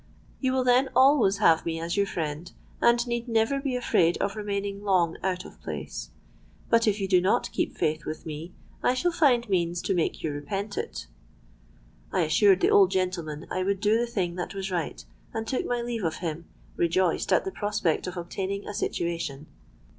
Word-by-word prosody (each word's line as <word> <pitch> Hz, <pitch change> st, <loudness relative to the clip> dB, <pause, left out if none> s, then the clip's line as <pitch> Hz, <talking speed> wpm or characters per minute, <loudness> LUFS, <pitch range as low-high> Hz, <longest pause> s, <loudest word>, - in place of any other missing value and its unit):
You 260 Hz, -1 st, 0 dB
will 260 Hz, -1 st, +2 dB
then 250 Hz, +2 st, +4 dB
always 255 Hz, -7 st, +5 dB
have 165 Hz, -6 st, +4 dB
me 165 Hz, -1 st, -2 dB
as 165 Hz, +1 st, -2 dB
your 200 Hz, -1 st, +2 dB
friend, 160 Hz, -1 st, -4 dB, 0.3 s
and 235 Hz, 0 st, +4 dB
need 235 Hz, 0 st, -3 dB
never 225 Hz, +4 st, +2 dB
be 270 Hz, -2 st, -2 dB
afraid 175 Hz, -8 st, +2 dB
of 200 Hz, +1 st, -2 dB
remaining 200 Hz, -1 st, -3 dB
long 180 Hz, -5 st, +2 dB
out 185 Hz, 0 st, -2 dB
of -, -, -13 dB
place. -, -, -6 dB, 0.6 s
But 230 Hz, 0 st, +4 dB
if 210 Hz, 0 st, +2 dB
you 195 Hz, -, -1 dB
do 185 Hz, -2 st, +4 dB
not 190 Hz, +3 st, +1 dB
keep -, -, -2 dB
faith 155 Hz, -1 st, 0 dB
with 155 Hz, -, -6 dB
me, 160 Hz, +2 st, -6 dB, 0.3 s
I 250 Hz, -, +2 dB
shall 350 Hz, +7 st, +1 dB
find 255 Hz, -8 st, +3 dB
means 175 Hz, -3 st, 0 dB
to 195 Hz, -, 0 dB
make 170 Hz, -3 st, -1 dB
you 155 Hz, -, -1 dB
repent 195 Hz, +8 st, -4 dB
it.'—I -, -, -8 dB
assured 190 Hz, +4 st, +4 dB
the -, -, +4 dB
old 195 Hz, -2 st, +6 dB
gentleman 180 Hz, -4 st, -2 dB
I 185 Hz, -, -1 dB
would 195 Hz, +1 st, 0 dB
do 210 Hz, +1 st, +3 dB
the 240 Hz, -, 0 dB
thing 190 Hz, -7 st, -2 dB
that 175 Hz, -, -4 dB
was 195 Hz, -1 st, -4 dB
right; 170 Hz, -, -3 dB, 0.3 s
and 225 Hz, -, -2 dB
took 255 Hz, +3 st, -2 dB
my 240 Hz, -1 st, -1 dB
leave 235 Hz, -3 st, -3 dB
of 160 Hz, -2 st, 0 dB
him, 165 Hz, -1 st, -4 dB, 0.3 s
rejoiced 170 Hz, +1 st, +1 dB
at -, -, +3 dB
the 385 Hz, -, -2 dB
prospect 205 Hz, -, -1 dB
of 180 Hz, 0 st, -5 dB
obtaining 195 Hz, +3 st, -4 dB
a -, -, -5 dB
situation. 165 Hz, -7 st, -3 dB
190 Hz, 190 wpm, -27 LUFS, 170-225 Hz, 0.6 s, old